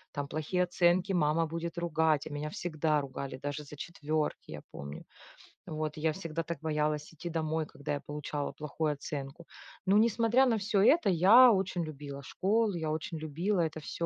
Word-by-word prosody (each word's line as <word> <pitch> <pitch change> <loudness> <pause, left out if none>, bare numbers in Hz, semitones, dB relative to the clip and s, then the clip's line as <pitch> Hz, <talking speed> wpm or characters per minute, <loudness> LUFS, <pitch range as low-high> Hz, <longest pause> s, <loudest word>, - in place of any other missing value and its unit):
Там 145 0 -2
плохие 155 +5 -1
оценки 180 +2 +2
мама 165 -1 +2
будет 165 +2 -4
ругать, 160 -3 +1
а - - -7
меня 150 +1 -4
всегда 155 -3 0
ругали, 135 -1 -6
даже 145 +2 -4
за 150 +1 -11
4, 155 - -3
я 75 - -7
помню. 70 +2 -8 0.6
Вот 155 -1 -3
я 155 0 +1
всегда 165 -2 -4
так 170 -3 -5
боялась 150 0 -1
идти 170 +2 -6
домой, 160 -1 -1
когда 145 0 -5
я - - -4
получала 145 0 -4
плохую 150 0 -2
оценку. 145 +3 -6 0.4
Но, 195 +2 +4
несмотря 230 +3 +4
на 230 -3 +2
всё 200 -1 +1
это, 310 +2 +5
я 215 +9 +8
очень 190 -3 0
любила 140 -2 -7
школу, 210 +4 +1
я 160 -2 -2
очень 160 +1 -3
любила 170 +6 -1
это 160 -1 -2
всё 170 +2 -4
160 Hz, 175 wpm, -31 LUFS, 150-180 Hz, 0.6 s, я